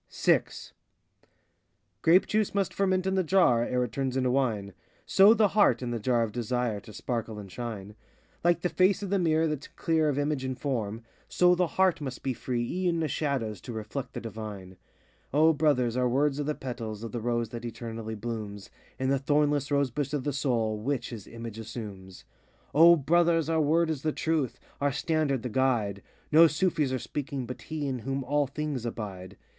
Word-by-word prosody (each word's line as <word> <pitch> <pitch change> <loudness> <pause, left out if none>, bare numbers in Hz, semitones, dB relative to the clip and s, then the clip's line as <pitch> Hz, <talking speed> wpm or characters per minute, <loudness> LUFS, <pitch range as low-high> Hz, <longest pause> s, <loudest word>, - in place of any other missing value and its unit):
VI - - +3 1.6
Grape 175 +4 +5
juice 215 -1 0
must 195 -2 0
ferment 185 -1 +1
in 190 - +1
the 190 -1 +2
jar, 160 -9 +4
Ere 125 +1 0
it 120 - -4
turns 135 +1 -2
into 130 -1 +1
wine; 110 -7 0 0.3
So 200 +4 +6
the 215 -2 +4
heart, 205 -9 +3
in 120 - -3
the 120 - -2
jar 120 +1 +2
of 110 - -3
Desire, 120 -1 -1
To 100 - -13
sparkle 115 -1 -4
and 100 -2 -9
shine. 105 -3 -6 0.5
Like 175 0 +3
the 180 - 0
face 190 +3 +2
of 195 - -4
the 200 - +2
mirror 160 -2 +2
that 150 -3 -2
's - - -11
clear 160 -2 +1
Of 140 - -1
image 145 -2 -1
and 130 -1 -3
form, 115 -5 -3 0.3
So 180 0 +4
the 180 0 +2
heart 185 -4 +3
must 130 -3 -6
be 135 - 0
free 120 -1 -2
e'en 175 -1 0
of 150 - -1
shadows 120 - -2
To 120 - -7
reflect 110 +5 -5
the - - -4
divine. 105 -4 -7 0.6
O 160 +2 +5
Brothers, 135 -6 +2
our 125 -1 +2
words 140 +3 +1
are 145 - -1
the 150 0 -1
petals 115 -4 -6
Of 115 - -5
the 120 - -4
rose 120 -1 -1
that 120 0 -7
eternally 115 -1 -6
blooms 105 -3 -6 0.3
In 130 0 -1
the 135 0 +2
thornless 145 0 +1
rose 140 -3 +1
bush 140 +2 -3
of 145 -3 -1
the 145 - -1
Soul, 115 -6 0
Which 130 +4 -2
his 110 -5 -8
image 115 -1 -8
assumes. 105 -5 -8 0.5
92 - - -3
O 170 +1 +9
Brothers, 165 +2 +2
our 160 -1 +2
word 160 +2 +2
is 150 -4 -3
the 155 - 0
truth, 155 -5 -1 0.2
Our 145 0 +2
standard 150 -3 0
the 125 - -3
guide; 110 -5 0 0.3
No 165 +2 +8
Sufis 155 -3 0
are 130 - 0
speaking, 140 +1 -4
but 125 - -7
he 155 -2 -4
In 130 -2 -2
whom 135 +4 -3
all 145 +2 +1
things 145 -2 -4
abide. 100 -6 -6
130 Hz, 200 wpm, -28 LUFS, 115-155 Hz, 1.6 s, O